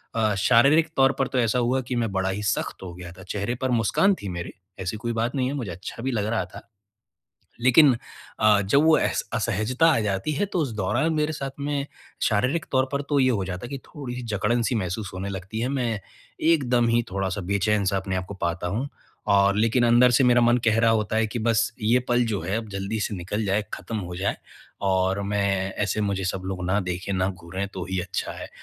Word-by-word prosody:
अ, 110 -2 +2
शारीरिक 140 +10 +4
तौर 135 0 +5
पर 135 - +2
तो 130 - -1
ऐसा 120 +1 +2
हुआ 125 +2 +1
कि 125 - -1
मैं 115 -3 0
बड़ा 95 0 0
ही 105 +2 -3
सख़्त 105 -1 -2
हो 90 -2 -7
गया 85 -1 -9
था, 95 +1 -13
चेहरे 105 +6 -3
पर 130 - 0
मुस्कान 125 - +3
थी 100 - -4
मेरे, 85 -1 -5 0.3
ऐसी 95 +3 -3
कोई 120 +2 -3
बात 115 +3 -1
नहीं 130 -2 +1
है, 135 - -2
मुझे 120 -10 -4
अच्छा 95 +7 -8
भी 135 - 0
लग 105 -4 -1
रहा 115 0 0
था। - - -13 0.9
लेकिन 130 +3 +6 0.5
अ, 105 -1 +5
जब 140 +9 +3
वो 160 -1 +6
अस - - 0
असहजता 115 - +1
आ - - +2
जाती 100 +6 -1
है 175 +8 0
तो 180 - 0
उस 140 -7 -1
दौरान 120 - +1
मेरे 150 0 0
साथ 135 -2 -4
में 145 0 -2 0.4
शारीरिक 125 +10 +1
तौर 130 -1 +3
पर 140 +1 0
तो 145 - +3
ये 130 0 +4
हो 100 -5 0
जाता 90 +4 -5
है - - -10
कि 140 - -4
थोड़ी-सी 125 -5 -7
जकड़न 110 +4 +1
सी 120 - 0
महसूस 95 0 -3
होने 95 +2 -4
लगती 95 +3 -5
है, 125 - 0
मैं 120 -6 -1 0.4
एकदम 125 -7 +3
ही 120 +1 +3
थोड़ा-सा 95 +1 -2
बेचैन-सा 100 -1 +1
अपने 95 -1 -2
को 100 - -6
पाता 85 -1 -2
हूँ 120 +10 -2 0.5
और 100 0 +4
लेकिन 115 +3 +3
अंदर 120 +2 +6
से 130 +2 +4
मेरा 120 0 +5
मन 120 +1 +4
कह 110 0 +3
रहा 115 0 +4
होता 110 -1 0
है 110 0 +2
कि 110 - -4
बस 115 0 +1
ये 115 +4 +4
पल 120 0 +3
जो 105 -3 -1
है, 95 +5 -1
अब 110 -2 -7
जल्दी 100 +3 -3
से 105 - -2
निकल 100 +5 -3
जाए, 100 +2 +1
खत्म 115 - -6
हो 90 -2 -6
जाए 100 +3 -1 0.5
और 95 +1 +1
मैं 100 -1 0
ऐसे 105 +2 -1
मुझे 100 -2 -1
सब 95 0 -2
लोग 95 -1 -4
ना 100 +3 +2
देखें, 90 +2 -3
ना 95 0 +1
घूरें 90 +2 -5
तो 90 -2 -4
ही 95 - 0
अच्छा 90 0 -4
है - - -7
110 Hz, 230 wpm, -25 LUFS, 95-125 Hz, 0.9 s, लेकिन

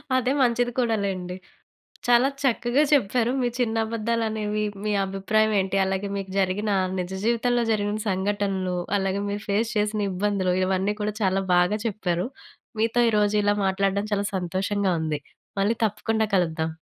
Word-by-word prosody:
అదే 255 0 +2
మంచిది 245 -1 +2
కూడా 230 -3 +2
లేండి. 180 -2 -3 0.7
చాలా 245 +2 +5
చక్కగా 250 +2 +2
చెప్పారు, 245 -2 +3
మీ 245 - +2
చిన్న 230 -2 0
అబద్దాలనేవి, 220 -2 -1 0.2
మీ 210 - 0
అభిప్రాయం 215 +3 +1
ఏంటి, 190 +1 -1
అలాగే 190 +1 -2
మీకు 195 -1 -5
జరిగిన 195 +2 0 0.3
నిజ 180 0 -3
జీవితంలో 240 +1 +2
జరిగిన 205 0 -1
సంఘటనలు, 190 -1 -1 0.2
అలాగే 195 +1 -1
మీరు 205 +1 -3
ఫేస్ 215 +3 +1
చేసిన 210 0 0
ఇబ్బందులు, 190 -1 0
ఇవన్నీ 190 +2 0
కూడా 210 0 -1
చాలా 195 0 +2
బాగా 180 +4 +3
చెప్పారు. 185 -4 -1 0.5
మీతో 230 +2 +2
ఈరోజు 210 0 +2
ఇలా 205 0 +3
మాట్లాడడం 195 +2 0
చాలా 200 0 +1
సంతోషంగా 190 +2 -1
ఉంది. 155 -2 -2 0.4
మళ్ళీ 210 +4 +2
తప్పకుండా 220 +2 -1
కలుద్దాం. 160 -2 0
205 Hz, 145 wpm, -25 LUFS, 190-225 Hz, 0.7 s, చాలా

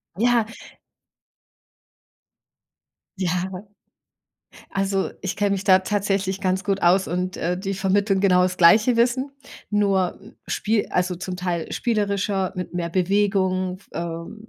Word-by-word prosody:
Ja. 235 +3 +3 2.8
Ja, 180 -3 0 0.2
aber 190 +2 -9 1.0
Also, 195 -1 -1
ich 190 +1 -3
kenne 205 -1 +1
mich 195 -1 -1
da 190 -2 +6
tatsächlich 195 -1 -1
ganz 190 0 0
gut 200 -1 -1
aus 185 +3 +4
und, 180 +2 -2
äh, 175 +2 -1
die 195 +1 -3
vermitteln 195 +1 +1
genau 180 -2 +4
das 180 0 0
gleiche 210 +8 +5
Wissen, 250 +4 +1 0.4
nur, 195 -3 +1
hm, 205 +3 -16
spie 215 0 0
also, 180 0 0
zum 185 +1 -5
Teil 175 -2 -3
spielerischer 200 -4 0
mit 175 -1 -5
mehr 170 -1 -2
Bewegung 185 0 +1
f 200 - -25
ähm, 170 +6 -6
190 Hz, 135 wpm, -23 LUFS, 180-205 Hz, 2.8 s, da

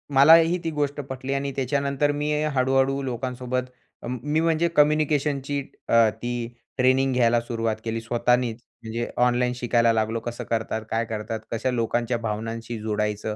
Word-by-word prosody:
मलाही 165 +5 +7
ती 165 - -2
गोष्ट 145 -1 -2
पटली 130 +1 -4
आणि 140 0 -2
त्याच्यानंतर 140 +1 0
मी 150 +1 -2 0.2
हळू-हळू 135 +1 +2
लोकांसोबत 125 0 -3 0.4
अं, 125 +1 -4
मी 150 +2 +1
म्हणजे 165 +1 +2
कम्युनिकेशनची 145 -2 +2 0.3
अ, 115 -1 +5
ती 120 +1 -4 0.3
ट्रेनिंग 130 +1 +3
घ्यायला 120 -1 +3
सुरुवात 115 -2 -2
केली. 115 0 -2
स्वतःनीच 120 0 +1 0.3
म्हणजे 115 +1 -3 0.2
ऑनलाईन 125 0 +2
शिकायला 120 -1 +2
लागलो 110 +1 0
कसं 120 +1 -6
करतात, 110 -1 -1
काय 115 +1 0
करतात. 110 0 -4
कशा 115 +3 -1
लोकांच्या 120 0 0
भावनांशी 115 +1 -4
जुडायचं. 105 0 -2
125 Hz, 145 wpm, -24 LUFS, 115-140 Hz, 0.4 s, मलाही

